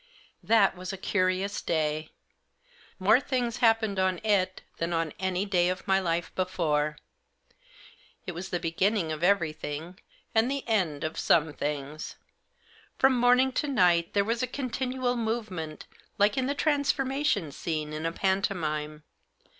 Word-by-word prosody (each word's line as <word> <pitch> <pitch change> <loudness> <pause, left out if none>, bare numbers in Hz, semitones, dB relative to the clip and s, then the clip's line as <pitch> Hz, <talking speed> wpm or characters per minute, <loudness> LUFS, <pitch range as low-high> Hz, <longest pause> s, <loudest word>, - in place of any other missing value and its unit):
That 210 -4 +4
was 185 +1 -6
a 195 - -6
curious 185 +1 0
day. 155 -1 -1 0.9
More 210 +5 +5
things 250 -3 -1
happened 225 -4 +2
on 185 -1 +2
it 195 -3 +1
than 170 +1 -2
on 165 -2 -1
any 185 +1 0
day 180 -3 +2
of 185 +2 -4
my 190 0 +4
life 170 -2 -2
before. 155 -5 0 1.3
It - - -3
was 180 +3 -6
the 175 - -1
beginning 175 +1 0
of 155 +1 -4
everything 165 -2 -1 0.3
and 225 +2 +3
the 275 -1 -3
end 180 -10 0
of 155 0 -3
some 160 -2 +3
things. 145 +1 -4 0.8
From 265 0 +5
morning 250 +2 +4
to 295 - -1
night 175 -10 +3
there 200 0 +3
was 230 +3 0
continual 255 -1 -2
movement 215 -9 -3 0.3
like 205 +1 +3
in 260 -1 0
the 280 - -1
transformation 275 - +1
scene 155 0 -3
in 155 +1 -4
a - - -1
pantomime. 160 -6 -1
185 Hz, 140 wpm, -28 LUFS, 165-225 Hz, 1.3 s, More